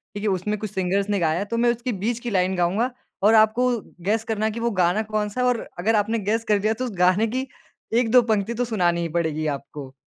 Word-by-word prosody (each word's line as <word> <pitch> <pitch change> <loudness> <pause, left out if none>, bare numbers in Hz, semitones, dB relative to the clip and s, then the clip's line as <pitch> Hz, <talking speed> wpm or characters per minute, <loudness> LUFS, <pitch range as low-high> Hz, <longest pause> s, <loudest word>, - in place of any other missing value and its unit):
ठीक 205 - -5
है? 210 - +1
उसमें 195 +3 -1
कुछ 215 -3 -5
सिंगर्स 195 +2 -1
ने 200 -2 +1
गाया 160 0 +1
है 200 - -2
तो 230 +3 -3
मैं 240 0 +3
उसकी 240 +1 -3
बीच 235 +1 0
की 240 - -5
लाइन 185 -1 +1
गाऊँगा 195 +9 +1 0.3
और 215 +2 +6
आपको 220 +4 +4 0.3
गेस 220 +3 +1
करना 220 -1 -2
है 220 - +1
कि 230 - -6
वो 235 0 0
गाना 185 +2 +2
कौन-सा 215 +2 -2
है? 250 - +3
और 245 -2 +1 0.2
अगर 220 +5 +2
आपने 215 +2 +1
गेस 220 +3 -1
कर 210 -1 +3
दिया, 215 +2 +1
तो 255 +3 -4
उस 240 - -4
गाने 185 +5 +3
की 260 +4 -3 0.5
1-2 245 +1 +5
पंक्ति 220 -1 0
तो 245 +1 -1
सुनानी 175 -6 +1
ही 165 - -2
पड़ेगी 160 -2 -1
आपको। 140 -1 -6
215 Hz, 250 wpm, -23 LUFS, 185-230 Hz, 0.5 s, और